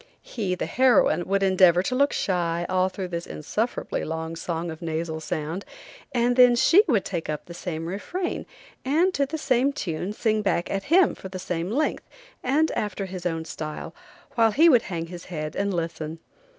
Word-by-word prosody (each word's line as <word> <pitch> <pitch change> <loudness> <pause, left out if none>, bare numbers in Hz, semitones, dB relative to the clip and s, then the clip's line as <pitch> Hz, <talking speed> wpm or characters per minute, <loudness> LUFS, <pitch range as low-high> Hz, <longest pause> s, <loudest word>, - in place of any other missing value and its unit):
He, 195 -6 -2
the - - -3
heroine, 250 -8 +3
would 195 +1 +1
endeavor 185 -2 +5
to 255 - -2
look 280 +3 +3
shy 175 -2 0
all 185 0 +2
through 185 -1 -5
this 170 -1 -4
unsufferably 220 +10 -3
long 160 +1 -4
song 165 0 -3
of 160 - -9
nasal 160 -1 -3
sound, 160 +3 -4 0.5
and 245 -1 +2
then 250 -1 +7
she 295 +11 +6
would 230 - +2
take 170 -4 -4
up 150 -1 -3
the 170 - -10
same 165 -2 -5
refrain, 275 - -4 0.4
and 330 +8 +2
to 280 -4 +1
the 315 +3 -4
same 270 -2 +2
tune 180 - -3
sing 215 0 0
back 185 -4 0
at 195 0 -2
him 350 +3 +4
for 190 - -9
the 185 - -6
same 175 -1 -3
length, 285 +8 -1 0.3
and 310 +4 +2
after 200 -1 -2
his 185 -2 -4
own 165 -1 -3
style, 155 -1 -6 0.4
while 230 -3 +4
he 315 +10 +5
would 245 -7 +6
hang 165 -3 -3
his 175 +1 -9
head 155 -3 -5
and 200 0 0
listen. 165 -2 -3
185 Hz, 190 wpm, -25 LUFS, 170-245 Hz, 0.5 s, then